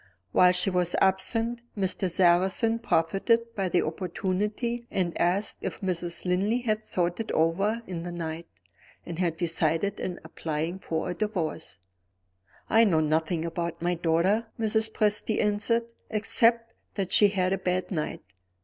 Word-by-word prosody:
While 180 0 +6
she 180 +1 +1
was 180 -1 +1
absent, 225 +5 +1 0.2
Mr. 190 -1 0
Sarrazin 190 +6 +3
profited 230 +6 +1
by 195 -4 -1
the 175 - +2
opportunity, 205 +8 -2
and 180 -3 -1
asked 185 +5 +1
if - - -4
Mrs. 175 -2 -2
Linley 200 +7 +1
had 215 -2 -1
thought 175 -1 -1
it 225 - -3
over 195 +8 +1
in 175 -3 -5
the 175 +1 -5
night, 165 -1 -5 0.6
and 170 -1 -6
had 170 -3 0
decided 165 +3 0
on 180 - -4
applying 160 +3 -4
for 165 0 -3
a - - -2
Divorce. 175 - -3 0.9
"I 225 +1 +5
know 180 -8 +3
nothing 160 +2 0
about 170 0 -3
my 175 +1 +1
daughter," 175 +7 +1
Mrs. 220 0 +1
Presty 215 0 0
answered, 215 +3 +1 0.3
"except 230 +1 +2 0.2
that 190 -3 -2
she 205 - +6
had 190 -2 0
a 195 - -1
bad 185 +1 -1
night. 155 -5 -3
185 Hz, 150 wpm, -27 LUFS, 170-215 Hz, 0.9 s, While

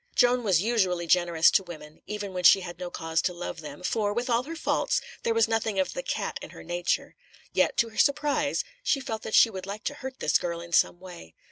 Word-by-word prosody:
Joan 245 0 +3
was 190 -5 +2
usually 190 -7 +1
generous 170 -1 +4
to - - +4
women, 155 -4 -11
even 205 -2 -5
when 180 -1 -4
she 195 - +7
had 175 -1 -8
no 180 -1 -5
cause 165 -1 -1
to 180 - -1
love 175 -1 -6
them, 150 +2 -9
for, 205 +2 0
with 240 +3 -2
all 235 +1 +3
her 330 +3 -6
faults, 330 - 0 0.2
there 230 - 0
was 225 -1 +4
nothing 225 -2 -1
of 190 - 0
the - - -3
"cat" - - -3
in - - -8
her - - -12
nature; 175 +1 -2 0.4
yet, - - +2
to 230 - +2
her 220 - -7
surprise, 290 0 +2 0.2
she 300 - +1
felt 225 -5 -5
that 220 - -2
she 225 - +6
would 190 -1 -7
like 205 +3 -6
to 285 - -2
hurt 265 -2 -8
this - - +2
girl 170 -1 -3
in 170 0 -10
some 175 - +3
way. 175 - -12
195 Hz, 240 wpm, -27 LUFS, 175-230 Hz, 0.4 s, she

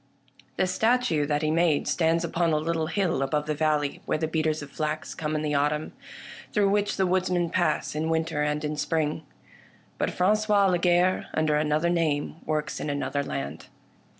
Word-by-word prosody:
The - - +3
statue 185 - +1
that 150 0 0
he 155 - +1
made 165 -2 +2
stands 165 0 +2
upon 170 -1 0
a - - +3
little 160 +1 -1
hill 175 -5 0
above 150 +2 0
the 155 - -1
valley 150 -1 0
where - - +1
the 160 +1 -1
beaters 155 -1 -1
of 140 - -11
flax 155 +1 -3
come 155 -1 -3
in 155 - -1
the 150 -1 -1
autumn, 150 +2 0 0.6
through 205 -3 +3
which 205 0 0
the 190 - +2
woodsmen 180 -2 +1
pass 175 -4 0
in 155 +2 -2
winter 160 -2 0
and 150 0 -1
in 150 0 -3
spring. 155 0 -1 0.8
But - - +1
Frangois 205 +1 +3
Lagarre, 180 +1 +2
under 155 -1 +2
another 155 +3 +1
name, 155 -3 0
works 155 0 -2
in - - -3
another 145 0 -1
land. 70 - -5
155 Hz, 180 wpm, -26 LUFS, 150-175 Hz, 0.8 s, The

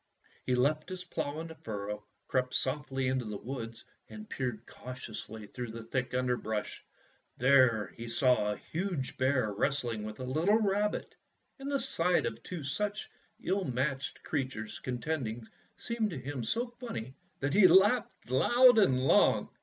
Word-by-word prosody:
He 125 - +3
left 150 +7 +1
his 185 -1 -5
plough 155 -3 -3
in - - -6
the - - -7
furrow, 105 -9 -5 0.2
crept 130 -1 0
softly 135 -1 -1
into 130 -1 0
the 105 -1 -4
woods, 115 -1 -6 0.2
and 215 0 -9
peered 120 - -3
cau 130 - -9
tiously 110 -3 -8
through 125 -2 -4
the 115 +1 -7
thick 125 +2 -2
underbrush. 120 -4 -1 0.5
There 125 -5 +4
he 115 0 -7
saw 115 -3 +3
a 105 - -3
huge 170 -6 -3
bear 130 -5 +2
wrestling 120 -1 0
with 105 0 -6
a - - -4
little 160 +11 +3
rabbit, 210 -1 0 0.5
and 275 +1 -5
the 280 - +3
sight 180 -8 +1
of 115 0 -4
two 175 0 -6
such 205 +9 -2 0.3
ill 190 +2 +1
matched 135 0 -2
creatures 130 -8 -3
contending 125 -4 -3 0.3
seemed 235 -2 -1
to 165 - -5
him 130 -1 -4
so 235 - 0
funny 130 - -5 0.3
that 140 +1 -1
he 195 -1 +8
laughed 205 - +3
loud 245 - +6
and 135 -11 +4
long. - - +4
130 Hz, 160 wpm, -31 LUFS, 115-175 Hz, 0.5 s, he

